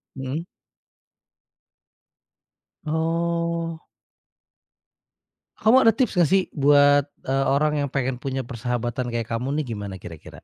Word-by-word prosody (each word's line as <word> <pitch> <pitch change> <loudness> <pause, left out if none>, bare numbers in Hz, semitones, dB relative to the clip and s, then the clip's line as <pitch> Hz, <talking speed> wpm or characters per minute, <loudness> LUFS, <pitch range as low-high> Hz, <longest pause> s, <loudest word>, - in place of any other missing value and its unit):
Mhm. 135 +6 -4 2.4
Oh. 165 +1 -1 1.8
Kamu 220 +3 +4
ada 225 -1 +5
tips, 255 -5 +1
nggak 165 - +4
sih? 190 -1 +4
Buat, 145 -1 +4 0.2
eee, 135 +1 0
orang 150 +2 +2
yang 140 - -2
pengen 130 -2 -2
punya 135 -2 -3
persahabatan 120 +1 -3
kayak 115 -1 -3
kamu 125 +4 -2
nih, - - -5
gimana 100 -2 -6
kira-kira? 80 -3 -12
140 Hz, 110 wpm, -23 LUFS, 125-165 Hz, 2.4 s, ada